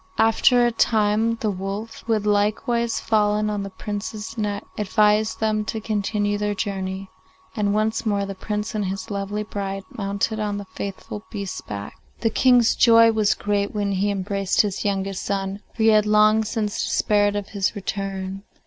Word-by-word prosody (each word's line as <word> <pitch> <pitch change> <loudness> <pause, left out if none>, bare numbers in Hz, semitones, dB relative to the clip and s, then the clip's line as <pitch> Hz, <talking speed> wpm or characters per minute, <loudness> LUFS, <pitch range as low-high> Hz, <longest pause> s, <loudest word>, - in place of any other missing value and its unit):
After 240 +2 +4
a 240 - +2
time 220 0 +2
the 215 - +1
wolf, 195 +4 -5
who 230 - +2
had 210 -1 0
likewise 215 +3 +1
fallen 210 -1 +1
on 205 -1 -2
the 195 - -5
Prince's 210 +3 -5
neck, 205 -3 -2
advised 210 +1 +2
them 215 -1 +1
to 220 +1 -3
continue 205 -1 -1
their 210 0 -1
journey, 190 -1 -4 0.4
and 205 -1 +1
once 215 +1 0
more 205 -3 0
the 195 - -5
Prince 210 +2 -4
and 210 -2 -1
his 195 +3 -4
lovely 200 +1 -2
bride 195 -2 -4
mounted 200 +2 -2
on 205 -1 -1
the 205 - -6
faithful 200 +2 -6
beast's 200 -3 -5
back. 100 -1 -7 0.2
The 225 - +1
King's 245 -1 +4
joy 230 -1 +6
was 215 -2 +2
great 205 0 -1
when 205 -1 0
he 200 +1 +1
embraced 195 -1 +1
his 205 -2 -2
youngest 195 -1 -2
son, 195 0 -2 0.2
for 225 - -1
he 225 - +6
had 215 -1 +4
long 215 +1 +5
since 215 -1 -2
despaired 205 -1 +2
of 205 -1 -3
his 200 0 -1
return. 195 -1 -4
210 Hz, 175 wpm, -23 LUFS, 200-220 Hz, 0.4 s, joy